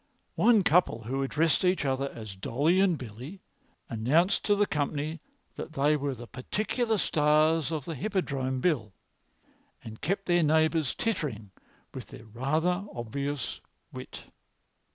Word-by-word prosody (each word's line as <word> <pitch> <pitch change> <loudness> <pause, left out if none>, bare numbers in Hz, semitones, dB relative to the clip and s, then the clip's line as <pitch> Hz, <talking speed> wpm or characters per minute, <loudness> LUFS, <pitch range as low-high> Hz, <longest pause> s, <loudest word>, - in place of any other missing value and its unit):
One 225 -4 +4
couple, 155 -10 +3
who 135 +5 -2
addressed 155 +5 +1
each 180 -4 +2
other 135 0 0
as 110 -4 -8
Dolly 145 - +1
and 190 -4 +3
Billy, 130 - -9 0.4
announced 150 - +2
to 205 - +4
the 205 0 +3
company 150 0 -2 0.4
that 160 - -6
they 145 +1 +3
were 140 -2 -2
the 120 0 -9
particular 215 - -1
stars 155 -1 +3
of 155 -4 -3
the 165 - -4
Hippodrome 135 -7 -2
bill, 120 - 0 0.9
and 110 -1 -10
kept 195 +5 -1
their 175 -1 +3
neighbours 160 -1 +2
tittering 135 - -3 0.4
with - - -7
their - - -12
rather 155 - 0
obvious 140 +4 -4 0.3
wit. - - -8
150 Hz, 135 wpm, -29 LUFS, 130-175 Hz, 0.9 s, One